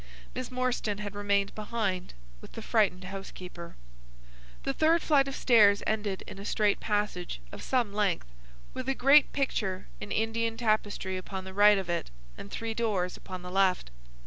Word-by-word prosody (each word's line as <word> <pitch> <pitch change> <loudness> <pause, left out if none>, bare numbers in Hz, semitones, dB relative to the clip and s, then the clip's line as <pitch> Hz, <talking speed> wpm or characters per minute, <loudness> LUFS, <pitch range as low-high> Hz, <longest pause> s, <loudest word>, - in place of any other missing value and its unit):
Miss 255 -2 -4
Morstan 250 -5 -1
had 205 -1 -5
remained 200 -1 0
behind 210 - -3 0.3
with - - -13
the 225 - -7
frightened 200 -6 +2
housekeeper. 180 -2 -8 0.9
The - - -1
third 320 - +3
flight 280 -3 +4
of 275 - -4
stairs 210 -5 +5
ended 210 -3 -1
in 195 - -9
a - - -7
straight 205 0 +1
passage 205 - -2
of - - -8
some 240 -6 0
length, 205 -4 0 0.5
with 255 0 -4
a 270 - +1
great 275 +3 +6
picture 195 -9 -1
in 205 - -7
Indian 225 +1 0
tapestry 210 -4 0
upon 190 +1 -6
the 190 0 -9
right 205 +1 +6
of 190 -2 -3
it 170 - -2 0.3
and 100 - -9
three 225 0 -4
doors 205 -6 -1
upon 185 -1 -8
the 180 - -7
left. 185 - +2
205 Hz, 170 wpm, -29 LUFS, 190-230 Hz, 0.9 s, great